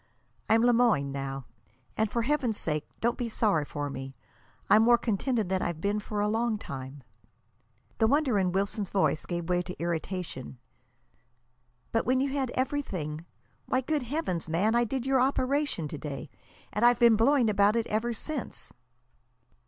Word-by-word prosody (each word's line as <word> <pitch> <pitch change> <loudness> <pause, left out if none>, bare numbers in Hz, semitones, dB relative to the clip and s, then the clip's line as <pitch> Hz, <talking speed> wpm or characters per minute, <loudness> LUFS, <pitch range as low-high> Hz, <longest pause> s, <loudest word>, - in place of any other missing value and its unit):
I'm 225 +1 +5
Le 245 0 +5
Moyne 215 - +3
now. 135 -1 -4 0.5
And, 220 -1 +1
for 235 +2 -1
Heaven's 250 -5 0
sake, 150 -2 -2
don't 235 +1 0
be 240 -2 -2
sorry 205 -9 +1
for 145 0 -4
me. 135 -1 -7 0.5
I'm 210 +2 +6
more 240 +1 +6
contented 230 -1 -1
than 190 -1 0
I've 170 -2 -2
been 205 +4 0
for 210 0 -3
a 205 - +2
long 225 +1 0
time." 135 -5 -8 1.0
The 220 - +4
wonder 275 -5 +2
in 185 -2 +1
Wilson's 195 +1 -1
voice 190 -5 +2
was - - -17
giving 175 -1 -3
way 180 +1 +1
to 180 0 -8
irritation. 170 -5 -4 1.3
"But 225 - 0
when 255 +1 +3
you 275 +1 +1
had 270 -3 -1
everything! 180 - -3 0.4
Why, 255 - +1
good 300 +3 -1
Heavens, 245 - -3
man, 190 +8 +2
I 240 0 +3
did 260 +2 -3
your 265 -1 +3
operation 270 - 0
to 150 - -6
day, 145 0 -6 0.4
and 210 - -1
I've 240 0 +6
been 235 -2 +6
blowing 240 +2 +4
about 205 0 +3
it 230 -1 +1
ever 220 +3 -1
since." 275 +3 -6
215 Hz, 170 wpm, -28 LUFS, 170-245 Hz, 1.3 s, I'm